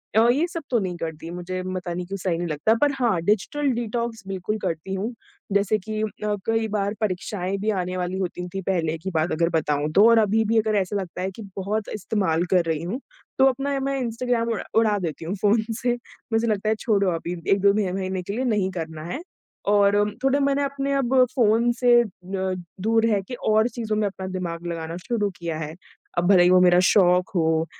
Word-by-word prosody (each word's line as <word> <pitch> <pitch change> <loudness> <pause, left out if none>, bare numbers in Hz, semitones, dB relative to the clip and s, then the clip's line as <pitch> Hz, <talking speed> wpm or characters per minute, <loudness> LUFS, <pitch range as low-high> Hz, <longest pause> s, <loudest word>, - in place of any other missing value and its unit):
अ, 225 +1 +6
ये 300 +7 +2
सब 330 -2 -6
तो 240 -3 +2
नहीं 185 -3 -3
करती 160 0 -6
मुझे 180 +1 -4
पता 180 -1 -4
नहीं 180 0 -4
क्यों 195 +1 -4
सही 175 -3 -1
नहीं 175 0 -2
लगता 155 +8 +2
पर 290 -1 +4
हाँ, 225 -8 +2
डिजिटल 245 - +1
डिटॉक्स 235 -1 -3
बिल्कुल 195 +2 -2
करती 165 +4 -3
हूँ। 210 +6 -2 0.4
जैसे 200 +1 +2
कि 215 +2 -4
अ, 210 -1 -2
कई 225 0 +1
बार 205 -1 -1
परीक्षाएँ 190 -1 -2
भी 210 +2 -1
आने 180 +1 -4
वाली 180 +1 -2
होती 180 -1 -3
थी 195 - -3
पहले 165 -4 -1
की 190 +4 -5
बात 160 +2 +1
अगर 170 +1 +1
बताऊँ 150 0 -1
तो 210 +3 +7
और 230 - +6
अभी 220 +1 +3
भी 225 +1 +2
अगर 215 0 0
ऐसा 190 +2 -4
लगता 180 -1 -7
है 190 +1 -2
कि 225 - -9 0.2
बहुत 205 +2 -2
इस्तेमाल 185 -5 0
कर 180 - +4
रही 160 -1 -1
हूँ, 215 +10 -3 0.4
तो 265 - +6
अपना 275 +2 -2
मैं 275 0 -1
इंस्टाग्राम 235 -1 -1
उ - - -4 0.2
उड़ा 215 -2 +2
देती 165 -2 -4
हूँ 175 - -2
फ़ोन 215 +2 +3 0.2
से, 245 -1 +2 0.4
मुझे 225 +1 +2
लगता 215 0 0
है 220 - +2
छोड़ो 200 -4 +2
अभी 170 +2 -4 0.2
1-2 200 0 +4
मह 185 -1 -2
महीने 190 -1 -2
के 200 - -5
लिए 255 +3 -1
नहीं 210 -5 +1
करना 160 -3 -6
है। 290 - -4 0.5
और 205 0 +4 0.3
थोड़े 270 +1 +3
मैंने 280 0 +2
अपने 280 0 -2
अब 265 -2 0 0.2
फ़ोन 235 0 +3
से 245 0 +3
अ, - - -6 0.8
दूर 225 +1 +3
रह 210 -3 +2
के 250 - -7 0.2
और 220 +2 +4
चीज़ों 225 -3 -3
में 215 - +1
अपना 190 -1 -6
दिमाग 175 -2 -4
लगाना 165 0 -4
शुरू 205 +2 -1
किया 165 -2 -4
है, 155 0 -5 0.4
अब 175 - +2
भले 180 -3 +7
ही 180 - +5
वो 185 0 +6
मेरा 180 0 +6
शौक 180 -2 +4
हो 160 -1 +2
200 Hz, 215 wpm, -24 LUFS, 180-225 Hz, 0.8 s, तो